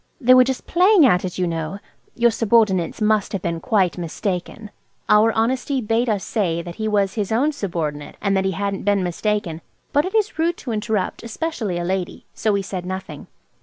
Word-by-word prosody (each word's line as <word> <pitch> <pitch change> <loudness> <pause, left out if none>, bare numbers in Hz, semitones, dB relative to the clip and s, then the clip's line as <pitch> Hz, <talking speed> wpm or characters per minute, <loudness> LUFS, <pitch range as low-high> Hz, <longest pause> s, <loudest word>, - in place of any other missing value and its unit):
They 255 -3 +5
were 255 0 +8
just 260 0 -3
playing 365 -1 +5
at 180 -8 +3
it, 180 - -5
you 180 - +1
know. 165 +2 -3 0.4
Your 235 0 +3
subordinates 220 -4 +2
must 215 -1 +1
have 195 - -3
been 170 -1 -2
quite 190 -5 +1
mistaken." 180 +4 -4 0.4
Our 210 +2 +5
honesty 255 +4 0
bade 230 +1 0
us 205 -3 0
say 170 -6 -1
that 175 -1 -9
he 220 - -2
was 200 -2 +1
his 210 -3 -3
own 265 +7 +2
subordinate, 165 - -4
and 200 -1 0
that 190 0 +1
he 190 - 0
hadn't 200 +2 -2
been 200 -2 +1
mistaken; 180 -2 -2 0.3
but 290 - +4
it 380 +3 -4
is 425 -6 0
rude 335 +1 +1
to 245 - -6
interrupt, 215 -3 -2
especially 230 - -3
a 175 - -2
lady, 185 0 -3
so 215 - 0
we 200 -1 0
said 185 -2 -5
nothing. 185 -5 -6
205 Hz, 200 wpm, -21 LUFS, 180-235 Hz, 0.4 s, were